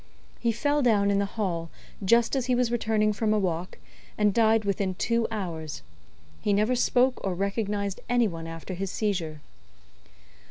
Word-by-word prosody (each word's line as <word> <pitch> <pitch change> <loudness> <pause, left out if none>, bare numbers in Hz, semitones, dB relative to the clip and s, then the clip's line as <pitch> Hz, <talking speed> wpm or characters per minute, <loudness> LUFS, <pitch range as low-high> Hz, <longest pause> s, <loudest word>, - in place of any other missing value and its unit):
He 235 - +1
fell 290 +6 +1
down 205 -5 +3
in 200 - +2
the 200 - 0
hall, 170 -6 -1 0.3
just 235 +6 +3
as 260 -2 -1
he 250 - +3
was 245 -1 +1
returning 220 -2 +1
from 215 0 +1
a - - +3
walk, 180 -3 -2 0.4
and 210 -1 +3
died 220 -1 +3
within 195 -2 -1
two 230 +3 +1
hours. 165 - -5 0.6
He 205 - +1
never 215 +5 +2
spoke 250 +1 +2
or 190 -2 -1
recognised 200 0 -2
any 240 -2 +3
one 165 -3 -6
after 165 +3 -7
his 190 +2 -3
seizure." 175 -8 -2
205 Hz, 165 wpm, -27 LUFS, 185-230 Hz, 0.6 s, down